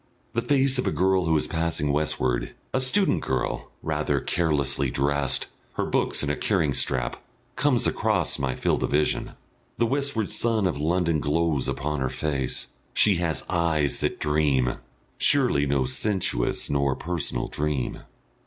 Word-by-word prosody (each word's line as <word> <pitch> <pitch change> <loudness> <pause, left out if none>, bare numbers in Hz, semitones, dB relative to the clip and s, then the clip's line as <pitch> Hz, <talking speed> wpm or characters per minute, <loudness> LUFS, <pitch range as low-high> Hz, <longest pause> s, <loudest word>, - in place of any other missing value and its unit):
The 115 - 0
face 135 +1 +2
of - - -1
a - - +2
girl 95 -1 +2
who 80 -1 +3
is 75 - 0
passing 80 -3 -1
westward, 65 -5 0 0.2
a 130 - +2
student 190 +10 +3
girl, 65 -1 -2
rather 75 -2 0
carelessly 70 -4 +1
dressed, 70 +1 +1 0.3
her - - -1
books - - +1
in 70 - 0
a - - -1
carrying 80 -9 0
strap, - - +1 0.3
comes - - +2
across - - +1
my 65 -2 -1
field - - 0
of - - 0
vision. 75 +1 0 0.4
The 115 - +2
westward 135 -4 -1
sun 115 -3 +1
of 85 -6 -1
London 85 0 +1
glows 75 -1 0
upon 75 +1 -2
her 65 -1 -1
face. 70 -3 -2 0.3
She 100 -4 +5
has 85 -3 -2
eyes 80 -4 +1
that - - -1
dream, 75 -5 +1 0.4
surely 125 - +3
no 70 -1 +1
sensuous 65 - 0
nor 70 -2 +1
personal 80 -7 -3
dream. 75 -4 -2
75 Hz, 155 wpm, -25 LUFS, 70-90 Hz, 0.4 s, She